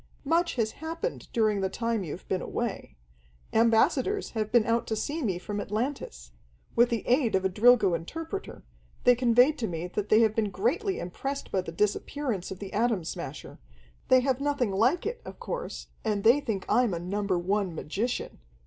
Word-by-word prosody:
"Much 335 +4 +2
has 225 -3 0
happened 330 +10 -5
during 215 -3 +2
the 190 - 0
time 230 0 -1
you've 170 +1 -7
been 185 - -1
away. - - -4 0.6
Ambassadors 235 - +3
have 215 -2 -2
been 235 -3 +4
out 230 +1 +1
to 220 - -1
see 290 +9 -3
me 195 -9 0
from 205 +3 -4
Atlantis. 210 - -4 0.4
With 240 +1 +5
the 230 -2 -2
aid 250 -3 +3
of 190 0 +1
a - - +3
Drilgo 210 -1 +5
interpreter, 325 - -5 0.4
they 245 - +7
conveyed 245 +4 +4
to 225 - -1
me 165 -1 -4
that 200 +3 -4
they 215 +1 +6
had 220 -2 +3
been 215 -2 0
greatly 295 - 0
impressed 270 +11 -5
by 190 - +1
the 175 - -7
disappearance 210 - -1
of 190 - -6
the 195 0 -8
Atom 225 -4 +1
Smasher. 160 -4 -7 0.5
They 255 0 +6
have 265 0 0
nothing 280 -6 0
like 245 - +2
it, 480 +2 -3
of - - -10
course, - - -5
and 210 -2 -1
they 235 +6 +6
think 220 -9 -3
I'm 240 -7 +3
a - - -3
Number 195 +1 -1
One 190 0 -1
magician. 210 +11 -3
225 Hz, 185 wpm, -28 LUFS, 195-260 Hz, 0.6 s, they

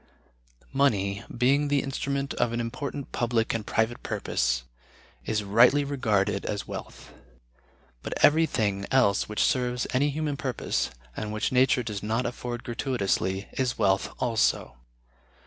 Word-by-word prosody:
Money, 100 -8 +1
being 140 +4 +3
the 140 -1 +1
instrument 140 0 -2
of 120 - 0
an 120 - -1
important 140 +4 -4
public 115 -2 0
and 115 -2 -3
private 115 +2 0
purpose, 60 0 -1 0.6
is 110 -1 0
rightly 120 +8 +5
regarded 110 -8 0
as 105 -1 -3
wealth; - - -8 0.9
but - - -5
everything 115 -11 +2
else 105 -8 +3
which 105 - +1
serves 125 -1 +1
any 140 +3 +3
human 150 -1 -2
purpose, 130 -5 -1 0.3
and 105 -1 -4
which 110 0 -1
nature 130 0 +3
does 105 -4 -4
not 110 +4 -1
afford 120 0 -4
gratuitously, 105 -6 -1
is 130 -3 -1
wealth 95 -3 +2
also. 115 - +1
120 Hz, 130 wpm, -27 LUFS, 105-135 Hz, 0.9 s, rightly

